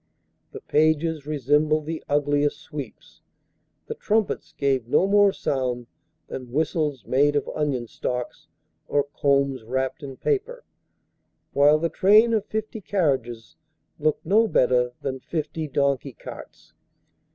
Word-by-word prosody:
The - - -9
pages 155 0 +1
resembled 150 +2 +1
the 160 0 -5
ugliest 145 0 +1
sweeps. 140 -6 -9 0.6
The - - -5
trumpets 215 0 -1
gave 135 -4 0
no 155 - +3
more 200 0 +5
sound 125 -7 -2 0.4
than 125 -2 -8
whistles 150 -1 -1
made 145 +3 +2
of 145 - 0
onion 140 -5 -1
stalks, 125 +2 -5 0.4
or 145 - +2
combs 140 -3 0
wrapped 130 +4 -2
in 135 -2 -8
paper; 485 +4 -2 0.9
while 145 +2 +5
the 165 +2 -1
train 215 +8 +5
of 215 -2 +1
fifty 220 0 -4
carriages 130 - -1 0.4
looked 155 0 0
no 215 +6 +4
better 125 - +2
than 130 -1 -3
fifty 155 +2 -4
donkey 140 -1 0
carts. - - -12
145 Hz, 125 wpm, -24 LUFS, 130-160 Hz, 0.9 s, more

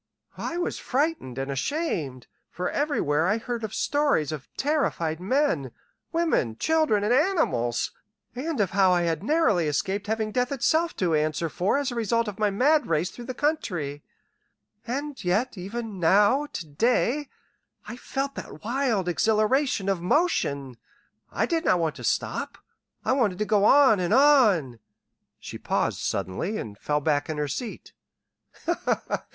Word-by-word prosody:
I 335 - -3
was 350 - -2
frightened 275 - -1
and 135 +1 -3
ashamed, 145 - -2 0.2
for 180 - -3
everywhere 170 - +1
I 210 +4 +2
heard 235 0 -4
of 215 - -3
stories 285 - +1
of 150 -4 -6
terrified 265 - 0
men, 185 - 0 0.4
women, 325 - +1
children, 310 -11 +2
and 215 +4 +2
animals, 245 - +1 0.4
and 290 +3 -3
of 195 -4 +1
how 190 -1 +4
I 175 -1 +2
had 165 -2 -1
narrowly 220 - +2
escaped 190 +8 -1
having 220 0 -1
death 250 +3 0
itself 320 +5 +1
to 175 -4 0
answer 155 +2 0
for 185 - 0
as 280 -2 -1
a - - -5
result 230 0 0
of 210 0 -6
my 210 -1 +3
mad 285 +9 +2
race 165 +3 0
through 240 - -10
the 255 - -5
country. 175 - -2 0.9
And 280 +3 -4
yet 205 +9 0
even 205 +2 -6
now 205 - +4
to 180 - -6
day, 240 - 0 0.6
I - - -6
felt 275 +2 -3
that 155 - -9
wild 235 -5 0
exhilaration 215 - +1
of 195 -3 0
motion. 145 - 0 0.5
I - - 0
did 335 -1 -1
not 185 - +3
want 165 -3 0
to - - -9
stop. - - -2 0.5
I - - +2
wanted 225 -9 +1
to 210 - -1
go 210 -1 +3
on 265 -5 +6
and 180 +4 +2
on 215 - +4 0.3
" - - -55 0.3
She - - -8
paused - - -1
suddenly, 100 - -2
and 105 - -6
fell 150 +7 -1
back 145 -1 0
in 155 - -3
her 150 -1 -1
seat. 220 - -6
210 Hz, 155 wpm, -26 LUFS, -, 0.9 s, on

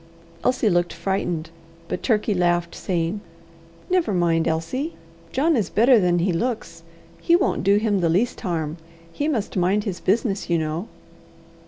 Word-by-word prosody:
Elsie 250 -2 +2
looked 175 -3 +2
frightened, 170 -2 -2 0.4
but 180 - -3
Turkey 215 -3 +1
laughed, 175 -2 +1
saying: 175 +2 -2 0.7
"Never 355 - +1
mind, 165 -2 +2
Elsie. 165 - -2 0.4
John 310 +5 +2
is 215 -7 0
better 235 +3 +5
than 180 -2 +2
he 175 +1 +1
looks. 230 +6 -3 0.4
He 340 - +4
won't 375 +2 +1
do 200 +1 +4
him 210 -2 +1
the 170 -2 +1
least 195 +9 +1
harm. 165 -5 -2 0.4
He 290 - -1
must 235 -10 -2
mind 190 +3 +2
his 190 -5 -4
business, 200 -1 0
you 170 - +3
know." 160 +5 -3
190 Hz, 155 wpm, -23 LUFS, 170-230 Hz, 0.7 s, better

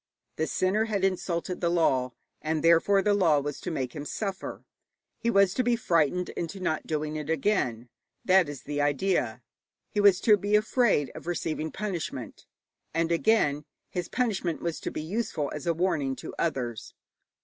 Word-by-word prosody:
The 160 - 0
sinner 200 +4 +1
had 205 -4 -2
insulted 180 -1 -1
the 170 - +2
law, 130 -7 +2 0.3
and 155 0 -1
therefore 170 +4 +5
the 205 - +3
law 170 -7 +4
was 145 0 -4
to - - -4
make 130 -7 -3
him 145 - -4
suffer. 195 +5 -5 0.5
He 235 - 0
was 195 -3 +4
to 255 - +1
be 240 0 +3
frightened 180 - +1
into 170 +3 -5
not 160 -4 -2
doing 155 0 -2
it 150 0 -5
again. 135 - 0 0.4
That 185 -4 +5
is 145 -3 -8
the 145 0 -2
idea. 145 - 0 0.5
He 205 - +1
was 200 -2 +6
to 210 -2 +6
be 205 +2 +1
afraid 210 - +2
of - - -10
receiving 160 -2 -2
punishment. 195 -7 -5 0.5
And 165 0 +1
again 165 -6 +2 0.3
his 180 -2 -3
punishment 200 -9 -1
was 170 -2 -3
to - - -4
be 155 - -5
useful 165 -5 -2
as 150 +3 -6
a 170 - +3
warning 150 -6 0
to - - -8
others. 125 -8 -2
170 Hz, 170 wpm, -28 LUFS, 150-195 Hz, 0.5 s, was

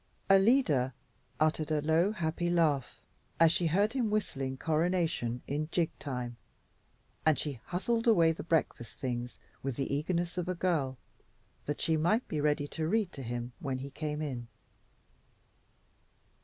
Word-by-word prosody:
Alida 195 - +4 0.4
uttered 155 0 +2
a 155 -1 +2
low, 160 +6 +3
happy 170 -3 -1
laugh 145 -8 +1 0.4
as 165 -1 +7
she 170 0 +1
heard 200 +7 +2
him 245 -5 +1
whistling 135 -11 -1
"Coronation" 160 -7 0
in 150 +2 -2
jig 170 -3 +1
time, 125 -4 -4 0.9
and 155 -3 +4
she 140 -3 -3
hustled 230 +6 -1
away 170 -8 +6
the 165 - -5
breakfast 155 -7 -1
things 125 -2 -3 0.2
with 135 -2 -3
the 135 +1 -2
eagerness 170 +4 -1
of 180 0 -3
a 185 - 0
girl, 160 -7 0 0.7
that 145 0 -2
she 160 -1 +2
might 210 +10 +2
be 150 - -2
ready 145 -1 +1
to 155 +1 -3
read 210 0 +1
to 140 - -8
him 120 0 -4
when 135 -3 -2
he 135 +2 -7
came 150 0 -3
in. 125 -5 -4
155 Hz, 150 wpm, -31 LUFS, 135-175 Hz, 0.9 s, as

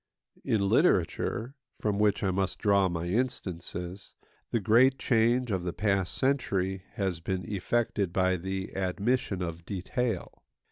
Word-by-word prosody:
In 100 -3 +1
literature 115 +5 +2 0.3
(from 105 -1 0
which 105 0 +2
I 95 - +2
must 95 0 -1
draw 100 -2 +3
my 85 -1 -3
instances) 90 -4 -3 0.3
the 115 - +1
great 120 +6 +5
change 120 0 +2
of 95 -2 0
the 90 -1 -3
past 100 -2 0
century 95 -9 0
has 95 -5 -2
been 90 +1 -3
effected 105 -1 0
by 95 0 +2
the 95 +2 -4
admission 95 +1 0
of 85 -1 -5
detail. 110 +7 -3
95 Hz, 135 wpm, -29 LUFS, 90-110 Hz, 0.3 s, great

